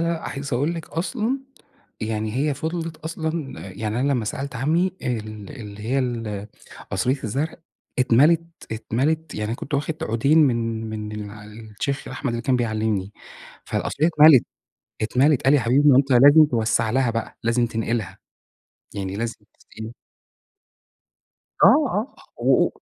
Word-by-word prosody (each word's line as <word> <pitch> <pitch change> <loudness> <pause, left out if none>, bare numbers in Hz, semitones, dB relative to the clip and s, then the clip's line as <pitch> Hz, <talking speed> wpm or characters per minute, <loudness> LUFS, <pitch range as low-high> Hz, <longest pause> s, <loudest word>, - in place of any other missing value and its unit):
لأ، 170 -1 -1
عايز 140 0 -5
أقول 145 +7 0
لِك 165 - -7
أصلًا 220 - -2 0.6
يعني 110 -1 -2
هي 145 +1 +1
فضلِت 160 +2 -4
أصلًا 160 -2 -4
يعني 110 +4 -3
أنا 140 +2 +2
لمّا 120 -4 0
سألت 135 +4 -4
عمي 165 +9 +1
ال 110 -4 -4
اللي 105 -1 -9
هي 125 +5 0
ال 115 -5 -3 0.5
قصرية 125 +8 0
الزرع 140 +9 -2 0.4
اتملت، 140 +7 +4 0.3
اتملت. 140 +8 -1
يعني 105 - -3
أنا 115 - -1
كنت 145 - -6
واخد 145 +3 -1
عودين 135 +5 +2
من 115 -6 +2
من 105 -1 -5
الشيخ 110 +5 -6
أحمد 135 0 -3
اللي 115 - -3
كان 130 -1 +2
بيعلمني. 110 -4 -1 0.5
فالقصرية 150 - -1
اتملت، 155 -5 +7 0.6
اتملت. 130 +5 +3
قال 135 - +4
لي: 145 - +6
"يا - - -2
حبيبي، 135 +5 +4
ما 130 - +6
أنت 135 0 +2
لازم 145 +5 +8
توسع 115 -3 +1
لها 130 0 +2
بقى، 115 -1 -4
لازم 120 +1 +2
تنقلها، 110 -4 -3 0.8
يعني 95 -1 -4
لازم 115 +1 -3 0.2
تسقيها" 110 +1 -9 1.7
آه، - - +10
آه، 265 -5 +2 0.3
و - - +4
125 Hz, 145 wpm, -23 LUFS, 110-150 Hz, 1.7 s, آه